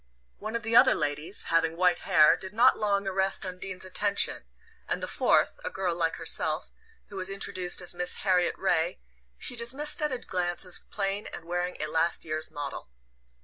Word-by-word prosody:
One 215 +2 -5
of 230 - -2
the 225 +1 -1
other - - +7
ladies, 150 +5 -2
having 165 0 +1
white 180 0 +3
hair, 155 -4 +5
did 190 +1 -7
not 245 +4 +5
long 200 -1 0
arrest 195 0 0
Undine's 185 0 -6
attention; 200 +2 +1 0.4
and - - 0
the - - -2
fourth, - - +2
a - - -1
girl 185 -3 -2
like 165 -1 0
herself, - - +1 0.4
who 200 - -9
was 185 0 -1
introduced 185 -2 -1
as 175 - -1
Miss 180 0 0
Harriet 180 -2 +2
Ray, 175 -2 0 0.4
she 245 - -3
dismissed 265 +7 -1
at 300 -1 +1
a 255 - -1
glance 180 -5 -1
as 180 - -1
plain 200 0 -3
and 165 - -8
wearing 175 +1 -3
a - - -1
last 160 +2 0
year's 155 0 -2
"model." 145 - -7
185 Hz, 185 wpm, -28 LUFS, 170-200 Hz, 0.4 s, other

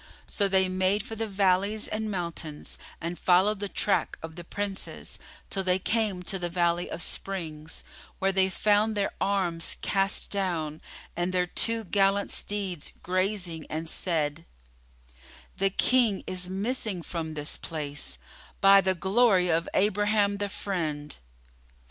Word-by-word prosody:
So 200 - +1
they 190 -1 +3
made 185 +2 +1
for 225 -1 -7
the 225 0 -2
valleys 200 +1 +1
and 215 0 -2
mountains 170 -5 -5 0.2
and 170 +1 -4
followed 190 +3 +4
the 205 -1 -3
track 200 - +1
of 160 0 -7
the 175 - -8
Princes, 200 +2 -5 0.3
till 195 - 0
they 185 0 +2
came 205 -2 0
to 190 +1 -3
the 175 -1 -2
Valley 175 0 +1
of 170 - -3
Springs, 160 -6 -3 0.3
where 195 0 +2
they 190 0 +3
found 210 +2 +2
their 200 - +1
arms 180 -4 +1
cast 195 0 0
down 170 -6 -1 0.3
and 175 +1 -1
their 180 -1 +2
two 230 +5 +1
gallant 195 +1 +2
steeds 195 -6 -2
grazing 185 -3 -1
and 160 +1 -3
said, 160 -2 -1 1.1
"The 195 0 +2
King 230 0 +3
is 180 -1 -2
missing 200 -2 -2
from 160 -2 -4
this 150 0 -2
place, 145 - -5 0.4
by 195 0 +8
the 190 -1 +1
glory 190 -1 +3
of 165 0 +1
Abraham 205 0 +3
the 205 0 -2
Friend!" 155 -8 -3
190 Hz, 140 wpm, -28 LUFS, 170-200 Hz, 1.1 s, by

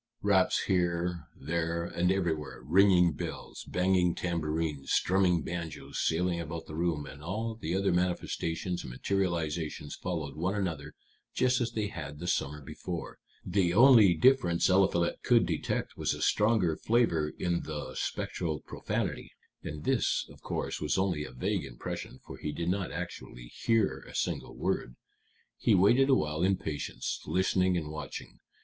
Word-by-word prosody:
Raps 100 -2 +3
here, 85 -3 0
there, 85 +3 -1
and 90 +1 +1
everywhere, 80 -9 -2
ringing 90 +3 +5
bells, - - -6
banging 90 -1 +2
tambourines, 80 -4 -2
strumming 90 -3 +3
banjos 80 -5 -5
sailing 85 +1 +1
about 85 0 -5
the - - -10
room, 80 -2 -1
and 70 +1 -10
all 110 +8 -3
the 90 -6 -3
other 100 0 +2
manifestations 90 -1 -1
and - - -8
materializations 80 -1 -2
followed 80 -6 -4
one 90 +6 -1
another 80 -8 -3 0.4
just 125 0 +2
as 120 -1 -1
they 110 -2 -1
had 75 -7 -7
the 85 - -7
summer 75 -3 -1
before. 85 +5 -6 0.3
The 90 -1 +1
only 115 -7 +8
difference 90 -5 +4
Eliphalet 95 -2 +2
could - - +4
detect - - -2
was - - -1
a - - -8
stronger 105 -7 +3
flavor 85 -11 +1
in 85 -1 0
the 75 -4 -5
spectral 80 +2 -2
profanity; - - -3 0.3
and 75 0 -6
this, - - +1
of - - -16
course, - - -3
was 75 +2 0
only 95 -5 0
a - - -9
vague 60 - -1
impression, - - -6
for - - -9
he 75 - -4
did 85 +3 -2
not 95 0 -1
actually 75 -8 -7
hear 115 -3 +1
a - - -13
single - - -2
word. - - -2 0.6
He 110 - +4
waited 120 +9 +5
awhile 75 - +2
in 95 +1 +3
patience, 75 -2 -4
listening 95 0 +2
and 75 -3 -4
watching. 75 -4 -7
85 Hz, 150 wpm, -30 LUFS, 75-95 Hz, 0.6 s, only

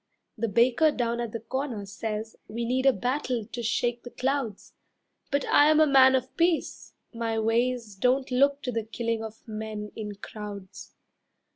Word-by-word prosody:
The 230 0 -1
baker 240 +8 +4
down 235 -4 -1
at 235 -2 -3
the 230 - -4
corner 245 -2 -4
says 215 +2 -5
We 235 +2 -3
need 260 +3 +1
a - - +8
battle 250 0 -2
to 240 +2 -6
shake 240 +1 0
the 245 - -9
clouds; 260 -5 -2 0.6
But 280 0 0
I 295 +1 +5
am 310 0 +5
a 310 - +7
man 265 -2 +6
of 255 0 -2
peace, 335 -1 0 0.2
my 230 -1 -2
ways 230 0 0
Don't 255 +6 +1
look 280 +3 +3
to 250 - -2
the 225 -1 -2
killing 230 0 -2
of 220 +1 -10
men 215 -1 -5
in 210 -2 -5
crowds. 200 -2 -9
235 Hz, 170 wpm, -27 LUFS, 220-260 Hz, 0.6 s, a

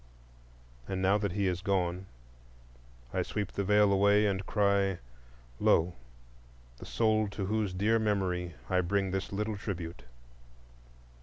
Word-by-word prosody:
And 95 - -3
now 95 +2 +3
that 100 -3 -2
he 100 0 0
is 90 -1 -1
gone, 95 -2 -1 1.1
I - - +1
sweep 105 -2 -3
the 100 - -2
Veil 105 0 +4
away 100 +2 +4
and 95 -2 0
cry, 100 -3 +2 0.6
Lo! 85 +2 +3 0.9
the - - -10
soul 110 -1 +2
to 100 -1 -4
whose 105 -1 -1
dear 105 +5 +2
memory 90 -5 -1
I 90 -1 +2
bring 95 +1 0
this 95 0 -3
little 105 +1 -2
tribute. 85 -6 -5
100 Hz, 135 wpm, -30 LUFS, 95-105 Hz, 1.1 s, Veil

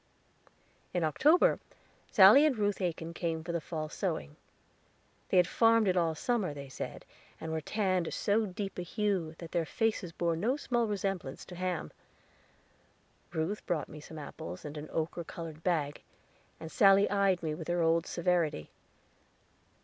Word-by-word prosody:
In 175 - +1
October 305 - +4 0.5
Sally 210 +9 +8
and 300 -6 +3
Ruth 205 -1 0
Aiken 170 -2 -3
came 165 -2 -2
for 170 - -4
the 170 -1 -1
fall 155 -1 -4
sewing. 155 - -3 0.9
They - - +3
had 180 - +6
farmed 225 +2 +4
it 185 - +2
all 165 -3 +1
summer, 200 -5 -1
they 140 -1 -8
said, - - -7 0.3
and 160 - -5
were 160 0 -2
tanned 185 -2 0
so 210 +1 +1
deep 195 0 -5
a - - -1
hue 180 -3 -1
that 170 -2 -9
their 170 -2 +1
faces 200 +1 -1
bore 170 0 0
no 230 - 0
small 240 -5 0
resemblance 195 -8 -3
to 180 - -10
ham. 180 -1 -3 1.4
Ruth 165 +6 -2
brought 155 -5 -1
me 150 - -9
some 160 +1 -11
apples 90 - -8
in 150 0 -6
an 150 +1 -7
ochre 165 +2 -2
colored 165 -1 -8
bag, 150 -5 0 0.6
and 160 0 -8
Sally 195 0 +6
eyed 195 -3 +2
me 155 -1 -1
with 160 +1 -7
her 175 -1 +1
old 165 0 +2
severity. 170 - 0
175 Hz, 160 wpm, -31 LUFS, 160-200 Hz, 1.4 s, Sally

